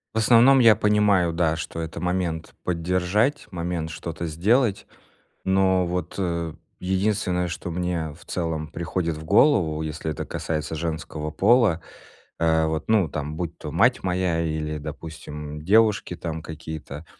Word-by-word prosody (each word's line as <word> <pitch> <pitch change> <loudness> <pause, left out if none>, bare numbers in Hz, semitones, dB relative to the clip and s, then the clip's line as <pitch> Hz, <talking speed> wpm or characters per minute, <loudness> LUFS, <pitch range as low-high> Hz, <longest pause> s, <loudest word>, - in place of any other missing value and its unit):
В - - -1
основном 120 +4 +6
я 115 -3 +7
понимаю, 105 -4 +3
да, 80 -1 +1
что 80 0 -5
это 80 +1 -5
момент 90 -3 -2
поддержать, 90 - 0
момент 85 -2 -3
что-то 85 +1 -5
сделать, 100 - +1 0.6
но 95 -1 +3
вот, 90 +1 -3
э, 85 -4 -2 0.3
единственное, 95 -1 0
что 90 0 -5
мне 85 -3 -2
в 80 - -17
целом 80 -3 -3
приходит 85 0 -2
в 80 - -8
голову, 85 - +3
если 80 0 -4
это - - -4
касается 75 -1 -3
женского 80 -1 -4
пола, 105 -5 +4 0.6
э, 80 -1 +3
вот, 80 +4 -3
ну, 105 -7 +3
там 75 +2 -4
будь 85 -1 -4
то 75 - -7
мать 115 - +3
моя 90 -2 0
или, 80 -1 -2
допустим, 75 0 -7
девушки 105 -1 +3
там 80 -2 -5
какие-то, 80 -1 -8
85 Hz, 145 wpm, -24 LUFS, 80-95 Hz, 0.6 s, я